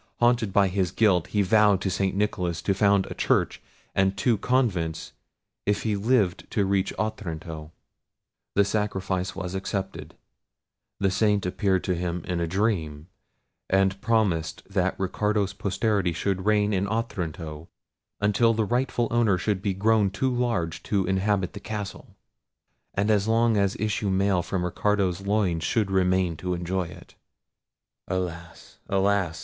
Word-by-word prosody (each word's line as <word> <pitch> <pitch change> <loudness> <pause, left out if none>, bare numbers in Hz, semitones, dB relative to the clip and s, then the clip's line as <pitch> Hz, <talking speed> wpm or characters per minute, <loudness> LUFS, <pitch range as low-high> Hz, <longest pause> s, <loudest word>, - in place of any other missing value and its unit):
Haunted 120 -3 +3
by 100 0 +4
his 95 -1 0
guilt 95 -3 +2
he 105 -1 +1
vowed 105 0 +4
to 95 - -1
St. 95 +1 0
Nicholas 90 -4 -1
to 100 - +2
found 100 0 +3
a - - -6
church - - 0 0.3
and 95 0 +1
two 115 +4 +2
convents, 100 -9 0 0.5
if 105 0 +1
he 110 -2 0
lived 100 -4 +1
to 100 - +1
reach 95 -1 +1
Otranto. 80 -6 -4 0.8
The 100 - +4
sacrifice 95 -3 -2
was 95 -1 -5
accepted: 95 -5 -4 0.8
the 100 -1 +2
saint 105 0 +2
appeared 95 0 0
to 90 - 0
him 85 -1 -3
in 90 -1 -2
a 85 - -1
dream, 85 -5 -1 0.6
and 95 0 +2
promised 105 -8 0
that - - -1
Ricardo's 100 +1 0
posterity 100 -2 0
should 95 +3 -2
reign 105 -1 +3
in 95 +1 0
Otranto 85 -8 -4 0.5
until 110 +3 +3
the 110 -1 +1
rightful 120 +1 0
owner 115 -5 +3
should 95 +1 -1
be 100 -2 -1
grown 105 0 +3
too 130 +7 -1
large 115 -10 -1
to 100 -3 0
inhabit 95 0 0
the - - -7
castle, 105 -1 -6 0.8
and 105 +2 +2
as 105 -1 +2
long 115 0 +3
as 100 -1 +1
issue 105 -1 -1
male 95 -1 +2
from 90 0 -2
Ricardo's 95 0 0
loins 100 -5 0
should 105 0 0
remain 90 -3 +2
to 90 +1 -2
enjoy 90 +1 -2
it—alas! 85 0 -9
alas! 95 -4 +1
95 Hz, 145 wpm, -26 LUFS, 90-105 Hz, 0.8 s, by